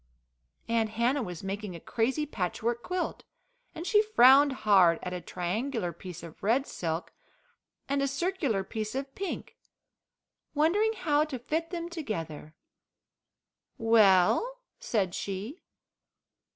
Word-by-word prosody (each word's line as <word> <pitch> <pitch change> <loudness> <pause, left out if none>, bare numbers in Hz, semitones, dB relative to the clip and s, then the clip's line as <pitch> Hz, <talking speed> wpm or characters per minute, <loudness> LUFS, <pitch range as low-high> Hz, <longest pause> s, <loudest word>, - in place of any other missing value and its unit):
Aunt 230 -1 +1
Hannah 250 +4 +2
was 180 -6 -6
making 195 -1 -4
a - - -7
crazy 260 - -1
patchwork 230 - -2
quilt, 360 +4 -3 0.5
and 330 +1 -6
she 420 +2 +5
frowned 285 - +6
hard 195 -9 +4
at 180 - -4
a 180 - -4
triangular 185 +2 -3
piece 175 0 -9
of 165 -2 -11
red 240 +7 +2
silk 165 - -4 0.7
and 275 0 +1
circular 280 - -1
piece 215 +3 -5
of 270 0 -4
pink, 390 +3 -5 1.0
wondering 395 +9 +3
how 300 -7 +2
to 290 -4 -5
fit 315 +7 -2
them 340 -2 -4
together. 165 - -6 1.2
"Well?" 225 - +4 0.2
said 195 -6 -1
she. 200 - -5
235 Hz, 120 wpm, -29 LUFS, 190-300 Hz, 1.2 s, frowned